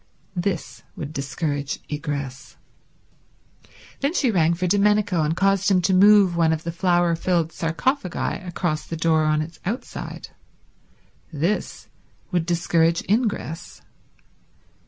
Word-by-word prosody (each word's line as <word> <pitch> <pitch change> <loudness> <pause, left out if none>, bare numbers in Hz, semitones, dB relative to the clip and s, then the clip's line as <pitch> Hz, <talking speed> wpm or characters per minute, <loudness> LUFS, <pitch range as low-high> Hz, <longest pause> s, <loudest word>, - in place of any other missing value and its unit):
This 175 -1 -3
would 150 0 -6
discourage 145 0 -3
egress. 140 -3 -5 1.4
Then 280 +5 -1
she 260 -9 +2
rang 170 -3 +3
for 180 +2 -2
Domenico, 205 -1 +2
and 155 +2 0
caused 195 0 +2
him 190 -2 +4
to 190 - +2
move 200 -1 +6
one 165 -1 +3
of 160 0 -2
the 170 - -3
flower 175 -1 +2
filled 170 -1 0
sarcophagi 180 - -2
across 175 -3 -2
the 165 - -4
door 160 -1 +2
on 155 0 +2
its 165 +1 -11
outside. 225 +8 -5 1.0
This 170 +7 -2 0.4
would 175 -3 0
discourage 170 -1 +2
ingress. 205 -6 -2
170 Hz, 120 wpm, -23 LUFS, 160-195 Hz, 1.4 s, move